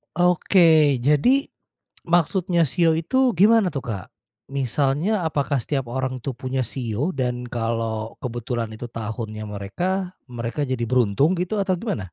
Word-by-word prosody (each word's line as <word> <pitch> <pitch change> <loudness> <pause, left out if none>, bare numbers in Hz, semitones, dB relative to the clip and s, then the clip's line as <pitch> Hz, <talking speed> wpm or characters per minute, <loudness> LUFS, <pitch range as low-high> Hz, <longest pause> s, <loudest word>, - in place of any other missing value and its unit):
Oke. 165 -6 +4
Jadi, 195 - +3 0.6
maksudnya 175 +1 +2
shio 160 +2 +2
itu 245 +10 +2
gimana 205 -1 +4
tuh, 140 - -3
Kak? 100 -6 -5 0.5
Misalnya, 145 - 0
apakah 140 -2 0
setiap 135 0 -2
orang 130 0 -2
tuh 135 -4 -4
punya 130 0 -2
shio 120 - -2
dan 125 -1 -2
kalau 115 -1 -2
kebetulan 120 -1 -3
itu 110 +2 -7
tahunnya 110 -1 -5
mereka, 180 - -3 0.2
mereka 120 +4 -3
jadi 130 -3 -1
beruntung 125 - +2
gitu, 185 +4 -2
atau 190 -2 +1
gimana? 120 - -4
135 Hz, 135 wpm, -23 LUFS, 115-175 Hz, 0.6 s, Oke